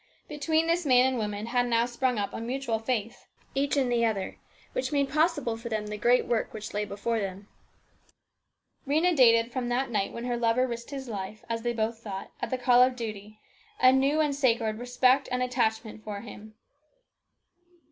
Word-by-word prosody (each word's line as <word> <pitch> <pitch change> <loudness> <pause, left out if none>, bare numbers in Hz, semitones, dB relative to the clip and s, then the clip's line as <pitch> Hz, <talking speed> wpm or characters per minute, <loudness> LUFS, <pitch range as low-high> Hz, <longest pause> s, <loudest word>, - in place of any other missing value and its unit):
Between 315 +2 0
this 335 +2 +1
man 255 -3 +5
and 260 -1 +1
woman 210 0 -3
had 245 +1 +1
now 235 0 +2
sprung 245 0 -1
up 200 -1 -2
a - - -5
mutual 240 -1 -2
faith, 230 -1 -3 0.3
each 280 +2 0
in 270 -2 +2
the 240 -1 +2
other, 215 -4 -1 0.3
which - - -2
made 280 -2 +1
possible 300 -6 +1
for 235 +1 -7
them 220 -1 -1
much 210 - -8
of - - -7
the 210 - -4
great 245 +3 +3
work 235 -2 -1
that 215 0 -7
lay 210 0 -1
before 210 +3 -2
them. 195 0 -5 1.4
Rhena 325 +5 +2
dated 230 -3 +5
from 245 -1 -3
that 245 +1 -1
night 200 -3 0
when 235 +1 -6
her 245 -1 -1
lover 235 +2 +2
risked 235 -2 -6
his 270 -2 -6
life, 210 -1 -6
as 230 0 -2
they 240 +1 -1
both 225 0 -2
thought, 195 -4 -7
at - - -2
the 255 - -1
call 245 0 +5
of 255 0 +4
duty, 215 -3 -7 0.4
a 255 - +7
new 275 +3 +2
and 295 -2 +1
sacred 230 -5 +1
respect 250 +2 +2
and 250 0 0
attachment 220 -3 -1
for 205 -2 -5
him. 215 -1 -11
240 Hz, 200 wpm, -28 LUFS, 220-260 Hz, 1.4 s, a